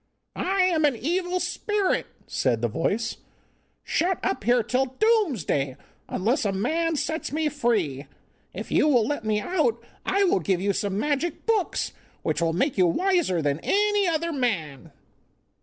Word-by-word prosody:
'I 385 +1 0
am 340 -4 +2
an 285 -4 +2
evil 355 +8 -1
spirit,' 385 +3 0 0.2
said 120 -3 0
the - - +3
voice, 220 - -1 0.7
'shut 360 +3 0
up 390 - -1
here 240 +2 +3
till 255 +4 +1
Doomsday, 265 - +1 0.3
unless 230 +9 0
a 205 - +1
man 320 - 0
sets 315 +2 -2
me 310 +1 0
free. 205 - -1 0.4
If - - -7
you - - +4
will 245 -7 +4
let 290 -2 -2
me 215 -1 +1
out 260 - +1 0.2
I 395 +1 +2
will 355 - +3
give 180 +1 0
you 200 +2 +1
some 200 0 -2
magic 295 +7 -1
books, 440 -5 0 0.3
which - - -1
will 165 -1 +2
make 250 - 0
you 180 - +5
wiser 340 - +1
than 145 +1 0
any 415 -1 +2
other 335 0 0
man. 165 - -2
265 Hz, 155 wpm, -25 LUFS, -, 0.7 s, you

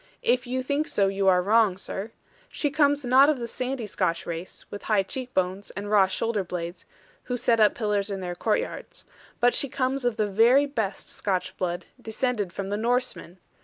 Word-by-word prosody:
If 245 +1 +2
you 255 +1 -2
think 285 +4 -1
so 195 -1 +2
you 195 0 0
are 180 -1 +5
wrong, 210 -2 +3
sir. 195 +2 -5 0.4
She 290 - -1
comes 285 -1 +2
not 265 +4 +6
of 305 - +2
the 235 -1 -4
sandy 255 0 -3
Scotch 170 -4 -1
race, 170 +2 -6
with 205 - -6
high 210 -3 +3
cheek 250 +6 -5
bones, 185 +2 -1
and 205 +1 -4
raw 200 -3 +5
shoulder 215 +2 -1
blades, 175 0 -6 0.4
who 250 - -2
set 230 -1 +2
up 210 -1 +5
pillars 210 -2 0
in 195 -1 -3
their 180 -1 -4
courtyards. 480 - -3 0.3
But 245 0 +4
she 280 - 0
comes 260 +1 -1
of 245 -2 0
the 215 - +2
very 230 +8 +4
best 220 -9 -3
Scotch 190 -3 -2
blood, 175 -1 -3 0.2
descended 220 -4 -2
from 195 +1 -5
the 205 - -1
Norsemen. 235 -5 -1
215 Hz, 195 wpm, -26 LUFS, 195-250 Hz, 0.4 s, not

